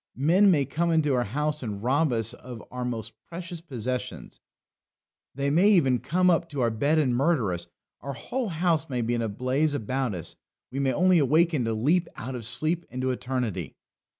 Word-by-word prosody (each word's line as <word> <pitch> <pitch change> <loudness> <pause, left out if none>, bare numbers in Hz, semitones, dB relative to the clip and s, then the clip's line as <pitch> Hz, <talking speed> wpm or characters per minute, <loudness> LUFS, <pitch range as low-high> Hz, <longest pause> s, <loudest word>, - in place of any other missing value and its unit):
Men 175 +9 +5
may 150 -7 +3
come 170 +6 -1
into 155 -4 +2
our 125 -1 +1
house 150 +7 -2
and 105 -4 -5
rob 140 +4 +2
us 115 -2 -1
of 120 -4 -10
our 125 0 -4
most 115 -2 -4 0.2
precious 170 0 -7
possessions; 125 -5 -5 1.0
they 140 +1 0
may 180 +7 +5
even 135 - +4
come 180 +8 +1
up 170 -1 +3
to 145 -3 -3
our 120 -1 +2
bed 140 +8 +1
and 135 -6 +2
murder 135 - +2
us; 85 0 -6 0.3
our 140 - -5
whole 245 - -3
house 165 -2 0
may 125 -3 -1
be 120 +2 0
in 120 - 0
a 115 - -1
blaze 130 +8 0
about 130 -2 -2
us; 85 - -6 0.4
we 135 - -3
may 135 -1 +2
only 180 +6 +4
awaken 155 -1 +3
to 115 -1 -1
leap 160 +10 +2
out 130 +4 -6
of 120 -3 -5
sleep 155 +8 0
into 130 +1 -2
eternity. 125 -8 -3
135 Hz, 195 wpm, -26 LUFS, 120-165 Hz, 1.0 s, Men